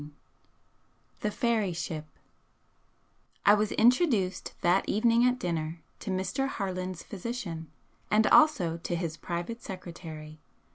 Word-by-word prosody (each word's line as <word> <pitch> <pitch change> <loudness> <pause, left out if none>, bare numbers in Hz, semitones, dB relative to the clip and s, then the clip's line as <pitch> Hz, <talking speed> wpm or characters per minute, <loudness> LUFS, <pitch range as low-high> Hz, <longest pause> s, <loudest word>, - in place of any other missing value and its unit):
II 150 +1 -10 1.1
THE 210 - 0
FAIRY 220 -5 +1
SHIP 160 -2 -4 1.4
I 205 - +8
was 210 0 +2
introduced 225 - +2
that 180 +3 +3
evening 230 +3 +4
at 250 0 +2
dinner 165 -6 -3 0.2
to 215 - -6
Mr. 190 +8 -1
Harland's 185 -6 -4
physician, 190 - -5 0.4
and 215 +1 +4
also 205 - +5
to 170 +1 -3
his 165 -2 -3
private 175 +9 -4
secretary. 165 -5 -8
185 Hz, 115 wpm, -29 LUFS, 170-230 Hz, 1.4 s, I